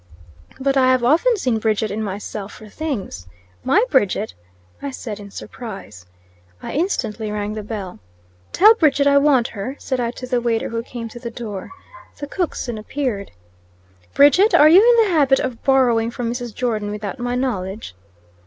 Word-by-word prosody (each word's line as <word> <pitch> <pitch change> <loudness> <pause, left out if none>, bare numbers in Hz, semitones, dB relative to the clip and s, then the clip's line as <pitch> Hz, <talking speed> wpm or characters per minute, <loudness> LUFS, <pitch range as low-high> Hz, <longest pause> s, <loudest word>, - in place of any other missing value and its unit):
"But 275 +1 +1
I 260 -1 +4
have 255 -1 +2
often 340 - +3
seen 250 - 0
Bridget 215 0 0
in 215 +2 -3
myself 205 0 -5
for 220 - -12
things." 205 - -5 0.4
"My 380 - +3
Bridget!" 195 - +1 0.5
I 280 - -4
said, 225 -6 -7
in 200 -1 -10
surprise. 195 - -9 0.5
I - - -7
instantly 225 - -2
rang 210 0 -3
the 215 - -5
bell. 205 - -7 0.5
"Tell 425 +4 +7
Bridget 295 -9 +2
I 280 0 +5
want 280 -5 +3
her," 220 +6 -6
said 260 -2 -3
I 235 -1 0
to 250 +1 -7
the 250 -1 0
waiter 230 -1 -1
who 230 0 -3
came 235 -1 -7
to 240 - -10
the 235 -1 -6
door. 215 -5 -7 0.5
The 285 - -5
cook 350 +4 -3
soon 235 -4 -4
appeared. 215 -3 -3 0.9
"Bridget, 360 +10 +5
are 300 - +7
you 345 +4 +8
in 470 0 +5
the 385 - -1
habit 275 -3 +4
of 255 -3 -4
borrowing 245 -4 +3
from 235 -1 -3
Mrs. 245 -1 -5
Jordon 220 -4 -2
without 210 +3 -5
my 245 0 -2
knowledge?" 210 - -3
240 Hz, 175 wpm, -20 LUFS, 210-275 Hz, 0.9 s, you